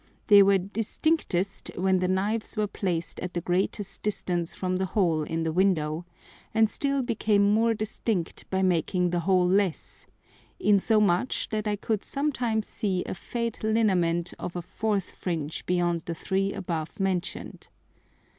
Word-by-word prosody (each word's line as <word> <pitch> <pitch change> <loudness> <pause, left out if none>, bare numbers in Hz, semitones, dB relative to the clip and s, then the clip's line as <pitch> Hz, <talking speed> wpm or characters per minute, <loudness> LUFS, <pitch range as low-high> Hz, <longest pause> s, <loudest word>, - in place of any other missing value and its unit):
They 205 -2 +8
were 195 0 +5
distinctest 200 - -1
when 190 +1 +3
the 180 - +1
Knives 210 +5 -1
were 215 - +2
placed 180 -4 -3
at 180 0 -5
the - - +1
greatest 190 +3 -1
distance 175 -5 -1
from 185 -1 -2
the 190 0 -1
hole 170 -6 +3
in 165 +2 -2
the 160 - 0
Window, 170 -2 +1 0.5
and 220 0 +5
still 275 +4 -1
became 210 -4 +2
more 225 +1 +3
distinct 215 -4 -3
by 190 0 0
making 180 0 +1
the 175 - +1
hole 180 +1 +3
less, 190 -2 0 0.5
insomuch 210 +1 +2
that 215 -1 -2
I 210 - +1
could 210 0 -2
sometimes 250 -7 -1
see 190 -4 -2
a - - -4
faint 230 +4 -4
lineament 185 -6 +2
of 180 - -5
a 175 - -3
fourth 205 +1 -2
Fringe 160 -4 -4
beyond 175 -2 +1
the 170 - -3
three 195 +3 -1
above 165 -3 -4
mention'd. 190 -1 -3
190 Hz, 150 wpm, -27 LUFS, 175-215 Hz, 0.5 s, They